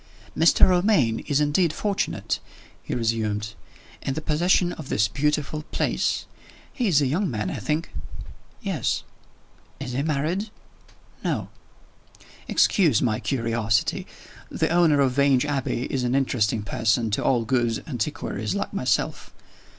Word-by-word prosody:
"Mr. 165 +2 +5
Romayne 175 - +3
is 145 -2 +2
indeed 150 +3 +2
fortunate," 200 +5 -2 0.4
he - - -4
resumed, 110 -2 -1 0.5
"in 135 - -2
the - - -1
possession 175 +3 +2
of 150 -4 -9
this 105 0 +2
beautiful 150 +4 -1
place. - - 0 0.5
He 245 -5 0
is 150 -6 +4
a - - +2
young 175 +9 0
man, 105 -6 -2
I - - -4
think?" 155 +1 -2 0.7
"Yes." - - -1 0.8
"Is 135 -2 -5
he 130 +3 -1
married?" 160 +8 -1 0.7
"No." - - -1 1.0
"Excuse 160 - +3
my 110 -3 0
curiosity. 115 -5 0 0.4
The - - 0
owner 165 -4 +4
of 135 -2 +3
Vange 135 -1 +3
Abbey 135 -4 -1
is 130 -2 0
an 125 +1 +1
interesting 115 -5 +1
person 110 +2 0
to 105 - 0
all 120 -3 +2
good 120 -2 0
antiquaries 115 - -3
like - - -3
myself. - - -1
135 Hz, 135 wpm, -24 LUFS, 115-155 Hz, 1.0 s, Mr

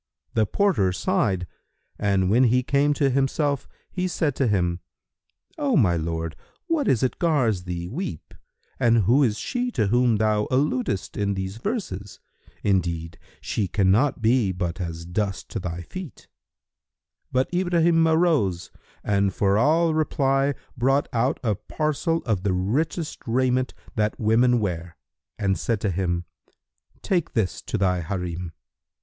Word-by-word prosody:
The 110 -2 +2
porter 180 - +2
sighed, 90 +1 0 0.5
and 100 -2 +2
when 125 +4 +5
he 125 +2 +3
came 140 +3 +2
to 140 -1 +2
himself, 140 +1 0 0.2
he 185 -1 -1
said 160 -5 0
to 135 - +2
him, 90 -4 +1 0.8
"O 280 -6 +2
my 90 -9 +4
lord, 80 0 -3 0.3
what 330 -5 0
is 120 - +2
it 130 - -1
gars 125 - +1
thee 85 -1 -4
weep 125 - -6 0.5
and 115 -3 +4
who 120 +9 +4
is 115 -6 +2
she 250 -1 -2
to 110 - +1
whom 120 0 +3
thou 105 0 +1
alludest 130 -7 0
in 100 -1 0
these 95 +2 -4
verses? 110 - -4 0.4
Indeed, 85 -4 -1 0.2
she 100 - -1
cannot 110 +7 +2
be 115 -3 +3
but 90 -1 -3
as 85 -1 -5
dust 95 +2 -3
to - - -4
thy 90 -2 -4
feet." 185 - -9 1.0
But 130 +6 0
Ibrahim 170 -2 +3
arose 160 - +2 0.3
and 100 -1 +1
for 100 0 +1
all 160 +5 +3
reply 140 -3 +1 0.2
brought 135 +3 +1
out 120 +3 +1
a 110 -3 +2
parcel 155 - -1
of 110 -7 0
the 95 -1 0
richest 145 - -1
raiment 130 +2 +1 0.2
that 105 -1 0
women 120 +3 +3
wear 90 -5 -4 0.4
and 95 -2 0
said 115 -3 0
to 100 - 0
him, 85 -1 -1 0.8
"Take 175 -4 0
this 110 -7 -1
to - - -3
thy 90 -3 +1
Harim." 90 -1 -4
110 Hz, 145 wpm, -24 LUFS, 95-140 Hz, 1.0 s, when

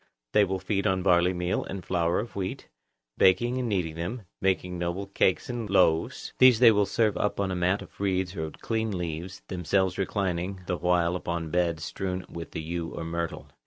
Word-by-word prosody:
They 105 - +5
will 95 0 -2
feed 100 +2 -1
on 95 -1 +1
barley 90 -1 +4
meal 90 0 -1
and 95 -2 -7
flour 85 -1 +1
of 115 +3 -6
wheat, 95 -2 -4 0.5
baking 120 +7 +4
and 125 -2 -1
kneading 90 -6 0
them, 90 +9 -4 0.2
making 90 -2 0
noble 85 +3 -2
cakes 95 -2 +1
and 120 -4 -4
loaves; 80 -4 +2
these 130 -2 +8
they 120 -1 +8
will 105 -2 +2
serve 110 -3 +1
up 105 - -1
on 100 -1 0
a - - -1
mat 90 +3 +1
of - - -18
reeds 95 -1 0
or 80 -3 -2
on 80 - -8
clean 110 -3 -2
leaves, 85 +2 -5
themselves 95 +1 0
reclining 95 -1 -1
the 90 -1 -1
while 90 -1 +2
upon 85 -3 -3
beds 85 -3 0
strewn 90 +1 -3
with 85 -1 -8
yew 80 +1 -3
or - - -6
myrtle. 85 0 -4
90 Hz, 195 wpm, -27 LUFS, 85-100 Hz, 0.5 s, these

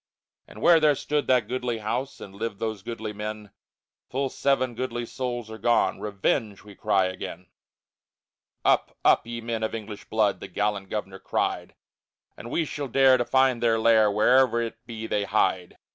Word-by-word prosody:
And - - -11
where 170 -1 +7
there 150 -2 +4
stood 150 +1 -1
that 125 -4 +3
goodly 125 -1 -2
house 120 +5 -3
And 95 - -10
lived 105 +1 -4
those 110 -2 -3
goodly 110 0 -5
men, 105 0 -6 0.6
Full 135 +1 -1
seven 130 -3 +1
goodly 120 0 -3
souls 120 -3 -4
are 110 - -8
gone. 120 +3 +2
Revenge, 105 0 -1
we 105 -1 -13
cry 95 -1 +1
again! 95 -1 -5
II - - -27 1.2
Up, - - +2
up, - - +4
ye 120 0 -5
men 115 -1 -3
of 110 +1 -2
English 105 -2 -8
blood! 110 -2 +1
The - - -7
gallant 105 -2 -2
governor 95 -3 -5
cried, - - -2 0.6
And 115 - -9
we 165 +6 0
shall 145 -1 -5
dare 130 +1 +5
to 120 - -1
find 130 -2 +2
their 115 -1 +3
lair, 110 -1 +5
Where'er 120 +3 +4
it 115 - -7
be 110 -2 -6
they 105 -2 -1
hide. 95 -3 0
115 Hz, 175 wpm, -26 LUFS, 105-125 Hz, 1.2 s, where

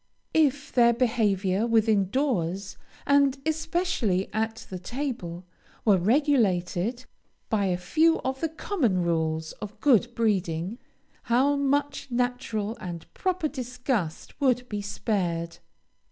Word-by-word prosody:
If 290 -3 +2
their 235 -1 +5
behavior 215 -4 +1
within 220 -4 +3
doors, 195 - -1 0.3
and 280 -1 +4
especially 315 - 0
at 225 +1 -2
the 185 - -4
table, 185 -7 -4 0.4
were 200 -4 +5
regulated 225 - +1 0.5
by 210 -3 +2
a 180 -2 +1
few 315 - +3
of 265 0 -3
the 325 - 0
common 290 - 0
rules 160 -1 -1
of 210 -1 -7
good 240 -3 +3
breeding, 195 -2 0 0.5
how 260 +4 +3
much 280 0 0
natural 240 -3 -1
and 170 -3 -7
proper 370 -4 0
disgust 250 - -3
would 250 -2 +2
be 210 -3 -3
spared! 175 -5 -2
225 Hz, 115 wpm, -26 LUFS, 185-270 Hz, 0.5 s, their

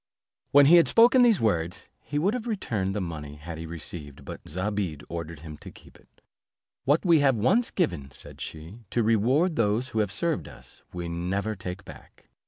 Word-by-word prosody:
When 145 0 +7
he 170 +5 +8
had 170 - +5
spoken 240 +3 +6
these 235 -5 +5
words 85 -6 -1 0.2
he 145 - -4
would 185 +8 +2
have 245 -1 -4
returned 105 - -2
the 105 - -1
money 75 -5 -6
he 75 - -15
had 80 0 -7
received, 80 -3 -8
but - - -8
Zobeide 95 -3 -3
ordered 85 -2 -6
him 75 -2 -9
to - - -11
keep - - -17
it. - - -29 0.6
"What 145 +7 +2
we 170 -3 +5
have 135 -3 +4
once 190 - +2
given," 85 - -1
said - - -10
she, 80 +8 -8
"to 120 - +1
reward 125 - +2
those 115 +3 +1
who 110 - -2
have 105 -3 0
served 100 - -1
us, - - -14
we 90 -1 -5
never 95 +6 -2
take 90 +1 -7
back. - - -15
105 Hz, 190 wpm, -26 LUFS, -, 0.6 s, he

